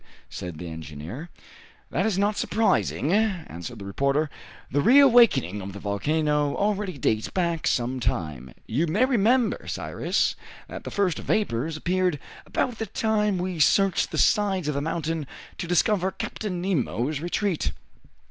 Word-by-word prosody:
said 90 -3 -6
the 85 - -7
engineer. 80 - -7 0.6
"That 190 +7 +1
is 205 -4 0
not 205 +1 +2
surprising," 205 -8 +1
answered 180 - -1
the 100 - -8
reporter. 140 +8 0 0.4
"The 145 - +2
reawakening 235 - +5
of 95 0 -7
the 100 - -8
volcano 150 +8 0
already 205 -4 -1
dates 110 -3 0
back 170 -3 -1
some 125 +1 0
time. 75 - -3
You 145 +10 0
may 205 +11 +3
remember, 245 -1 +2
Cyrus, - - -1 0.3
that - - -8
the - - -4
first 195 -4 0
vapors 155 - -1
appeared 180 -1 +1 0.3
about 245 -3 -1
the 225 - -2
time 210 -3 +1
we 180 -1 -3
searched 195 +6 +3
the - - -4
sides 195 -6 +2
of 150 - 0
the 140 - -1
mountain 160 -1 -2 0.3
to 175 - -3
discover 185 +2 +2
Captain 190 -1 -4
Nemo's 150 - -1
retreat. 175 - -1
165 Hz, 145 wpm, -25 LUFS, 130-200 Hz, 0.6 s, reawakening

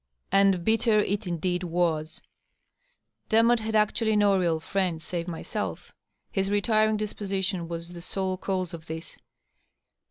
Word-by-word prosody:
And 195 -3 +4
bitter 225 0 +3
it 205 -1 0
indeed 180 +1 -1
was! 165 -3 -1 1.1
Demotte 230 +1 +5
had 220 0 -3
actually 215 +1 +2
no 205 -1 +4
real 170 -4 +1
friend 180 0 -1
save 170 +1 -4
myself. 170 -2 -5 0.4
His 195 0 0
retiring 215 +1 +2
disposition 195 -4 -2
was 170 0 -5
the 175 -1 -9
sole 190 +1 -2
cause 185 -2 -2
of 165 0 -9
this. 160 +1 -7
190 Hz, 130 wpm, -27 LUFS, 170-210 Hz, 1.1 s, Demotte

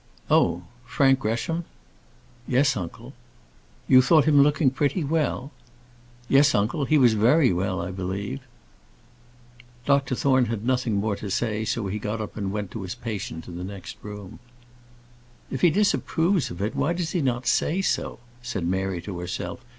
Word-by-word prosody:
"Oh! 85 +1 +3 0.2
Frank 135 +2 +3
Gresham." 135 +9 -2 0.8
"Yes, 135 +3 +3
uncle." 90 -4 -7 0.7
"You 130 -1 +7
thought 150 +2 +4
him 145 -2 +5
looking 145 -1 +3
pretty 145 +5 0
well?" 150 -2 -1 0.8
"Yes, 140 +3 +5
uncle; 120 +9 0
he 155 - +3
was 125 -5 +5
very 120 - +4
well, 95 +1 -1
I 90 +1 -4
believe." 95 -3 -4 1.5
Dr 140 -2 +2
Thorne 130 -1 +3
had 115 -1 -4
nothing 125 -3 +1
more 105 +1 0
to 105 - -6
say, 110 +1 -1
so 115 -1 -2
he 100 +2 -3
got 105 +2 -3
up 110 - -6
and 100 -3 -3
went 105 -2 -4
to 110 - -6
his 95 +4 -5
patient 105 -9 -6
in 85 0 -7
the - - -5
next 95 -1 -8
room. 105 -2 -9 1.1
"If 130 - -3
he 175 - +6
disapproves 180 -2 +1
of 85 +3 -5
it, 105 - -2
why 165 - +1
does 175 -2 -3
he 175 - 0
not 125 -2 -1
say 160 +8 +1
so?" - - -1 0.2
said 120 -8 -4
Mary 95 -1 -1
to 90 -2 -6
herself. 90 +8 -5
120 Hz, 165 wpm, -25 LUFS, 100-140 Hz, 1.5 s, You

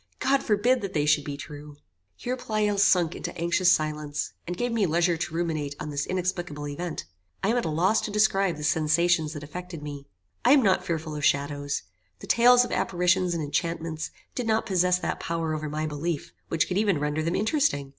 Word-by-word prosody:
God 275 0 +2
forbid 240 +4 +2
that 195 -2 -5
they 150 -1 +2
should 150 -1 +3
be 140 -1 -5
true." 145 0 -9 0.4
Here 250 +1 -3
Pleyel 215 -4 -1
sunk 180 -4 +4
into 175 - -6
anxious 175 +2 +3
silence, 150 -2 -1
and 175 0 -4
gave 245 0 -1
me 220 -4 +2
leisure 170 +2 +2
to 165 0 -4
ruminate 155 -4 -2
on 150 - -5
this 145 0 -2
inexplicable 175 -5 -2
event. 155 - -5 0.4
I 195 - +2
am 235 - +2
at 240 - 0
a - - -1
loss 180 +8 +2
to - - -4
describe 195 -4 +2
the 150 - -7
sensations 160 +1 +2
that 145 -2 -7
affected 170 +1 -7
me. 145 -1 -7 0.4
I 260 - +6
am 280 -3 +5
not 190 -2 +3
fearful 160 -3 -3
of 150 - -5
shadows. 145 0 0 0.3
The - - -10
tales 245 +1 +6
of - - -8
apparitions 180 0 +1
and 165 - -2
enchantments 160 +1 -2 0.2
did 245 -3 -3
not 220 0 +2
possess 180 -3 +2
that 180 - -3
power 165 -1 -2
over 155 -1 -3
my 155 +1 -2
belief 155 +1 -3
which 165 - +1
could 185 +2 0
even 205 -5 +2
render 150 +1 -1
them 165 +2 -1
interesting. 215 - +1
170 Hz, 205 wpm, -26 LUFS, 150-195 Hz, 0.4 s, I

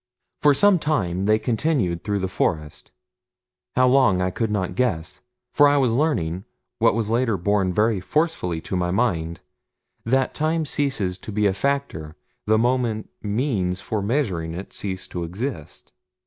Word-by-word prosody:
For 145 -1 +5
some 205 +2 +5
time 95 - -1
they 110 +1 +4
continued 115 - 0
through 105 -1 -1
the 95 -1 -1
forest 75 -4 -2 0.8
how 130 0 +4
long 125 -8 +4
I 90 0 0
could 115 +3 -1
not 100 -4 -1
guess 95 -10 -1 0.3
for 145 - +6
I 145 0 +3
was 130 -5 +2
learning, 95 - 0 0.4
what - - +4
was 110 -2 -1
later 115 -3 +1
borne 95 +1 +1
very 105 +2 +2
forcefully 95 - -1
to 95 - -4
my 90 -1 0
mind, 90 -6 -1 0.6
that 130 +3 +1
time 160 +1 0
ceases 135 -12 -1
to 110 - -8
be 105 +1 0
a 100 - +3
factor 100 - -2 0.3
the 110 +1 +4
moment 120 -2 0
means 105 -5 -1
for 110 0 -3
measuring 100 - -1
it 95 +3 -8
cease 95 -2 -5
to 90 - -4
exist. 90 - -6
105 Hz, 160 wpm, -23 LUFS, 90-130 Hz, 0.8 s, for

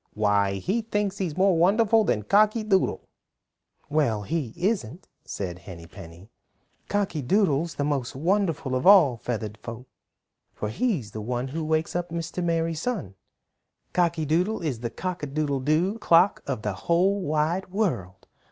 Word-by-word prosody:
Why, 100 -2 +2
he 195 - -1
thinks 205 -2 -2
he's 180 -5 -3
more 190 -1 +4
wonderful 215 +6 +4
than 105 - 0
Cocky 215 - +3
Doodle." 195 -3 +1 0.8
"Well, 140 -9 +1
he 150 -1 -2
isn't," 180 - -2 0.2
said 90 -3 -5
Henny 85 -2 -10
Penny. 85 +5 -13 0.6
"Cocky 200 -7 -1
Doodle's 165 - +1
the 145 - -1
most 140 -5 -2
wonderful 165 -3 0
of 130 +6 0
all 170 -12 +7
the - - -30
Feathered 110 -3 -4
Folk, 120 +2 -8 0.7
for 105 - -3
he's 130 - -1
the 110 - -6
one 125 +3 -3
who 160 +4 -4
wakes 155 +2 -1
up 175 0 -2
Mr. 170 +2 -4
Merry 165 -1 0
Sun. 160 - -3 0.8
Cocky 170 -3 +1
Doodle 175 +7 0
is 135 -8 -2
the 120 0 -3
cock 180 +7 -5
a 145 - -3
doodle 140 -1 -1
do 165 +10 +1
clock 175 -1 +4
of 130 -6 -3
the 105 - -1
whole 180 - +1
wide 160 +3 -1
world. 155 - -2
160 Hz, 160 wpm, -25 LUFS, 120-190 Hz, 0.8 s, all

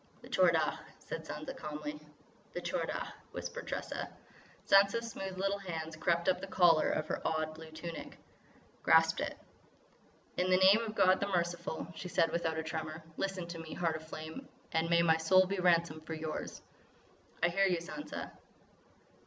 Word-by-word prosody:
"The - - -11
Tchor - - +5
Dagh," - - +1 0.2
said - - -6
Sansa - - -6
calmly. 150 0 -5 0.5
"The - - -3
Tchor - - -1
Dagh," - - -4 0.2
whispered - - -5
Tressa. - - -4 0.6
Sansa's 200 +4 +5
smooth 190 -2 -5
little 195 +1 0
hands 165 -4 -5
crept 170 +2 +1
up 185 - +4
to 195 - -5
the - - -16
collar 170 -4 +5
of 155 - 0
her - - -2
odd, 155 0 0
blue 160 0 -10
tunic; 165 +1 -7 0.6
grasped - - +5
it. - - -3 1.0
"In 180 +1 +1
the 185 - +6
name 190 +3 +7
of 220 -1 -5
God 190 -2 +5
the 200 - 0
Merciful," 175 -3 -1
she 180 - -6
said 165 -2 +2
without 165 -2 -1
a 160 - -1
tremor, 160 0 -4
"listen 195 -2 -2
to 170 -1 -6
me, 165 -1 -7
Heart 165 -2 0
of 160 0 -12
Flame, 155 0 -7 0.2
and 165 +1 +1
may 170 0 +5
my 160 -1 +5
soul 185 +4 +5
be 195 +1 -2
ransom 170 -3 +3
for 160 +1 -5
yours!" 155 0 -5 0.8
"I 175 - +5
hear 195 +3 +3
you, 180 -2 +2
Sansa." 190 - -6
170 Hz, 180 wpm, -33 LUFS, 160-185 Hz, 1.0 s, name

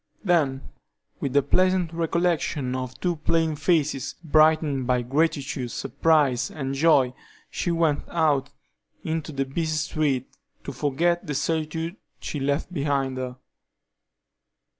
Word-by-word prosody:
Then, 150 -8 +1 0.5
with 135 - -2
the 140 -1 +4
pleasant 185 +2 +2
recollection 165 -5 0
of 130 0 -5
two 175 -2 -1
plain 160 0 +1
faces, 150 -4 0
brightened 155 -4 +3
by 125 -1 +2
gratitude, 140 -1 0
surprise, 145 -3 +1
and 135 -3 -4
joy, 135 -3 +4 0.4
she - - -2
went 165 -3 +1
out 150 -5 +1 0.5
into 160 -1 -3
the 135 -1 -1
busy 155 +3 -2
streets 145 -4 -1 0.3
to - - -5
forget 170 +5 0
the 145 - -2
solitude 160 +4 -2 0.2
she 150 - -4
left 140 +5 -1
behind 140 -4 0
her. 125 -1 -5
150 Hz, 120 wpm, -25 LUFS, 135-165 Hz, 0.5 s, the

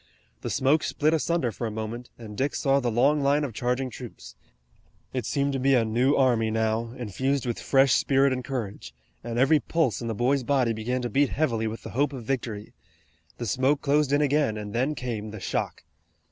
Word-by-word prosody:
The - - -4
smoke 145 +4 +2
split 155 +1 +1
asunder 160 -5 0
for 115 +2 -4
a - - -3
moment, 110 +3 -5
and 110 -3 -9
Dick 135 +6 -1
saw 140 0 +2
the 125 -3 -1
long 140 +6 +3
line 140 +2 +2
of 135 -5 -4
charging 125 +3 -1
troops. 120 -2 -10 0.8
It 125 -4 -2
seemed 140 0 0
to 135 - -1
be 135 +1 +3
a 115 -2 +3
new 125 +6 +2
army 120 -4 +3
now, 110 +2 -1
infused 130 +4 -1
with 120 -2 -2
fresh 135 -1 +4
spirit 135 0 +3
and 130 0 -3
courage, 105 - -5 0.3
and 120 0 -4
every 140 +5 +4
pulse 155 -7 0
in 115 - -4
the 115 - -2
boy's 130 +5 +2
body 125 -2 +1
began 125 +3 -2
to 120 - -2
beat 140 +3 +3
heavily 115 -7 0
with 110 +1 -6
the - - -7
hope 140 +3 0
of 130 -3 -6
victory. 110 -4 -4 0.6
The 120 - -4
smoke 135 +6 +1
closed 145 0 +2
in 145 +1 +3
again 145 -6 +1
and 105 -1 -6
then 130 +6 0
came 115 -5 -4
the 105 0 -8
shock. - - -3
125 Hz, 205 wpm, -26 LUFS, 115-140 Hz, 0.8 s, fresh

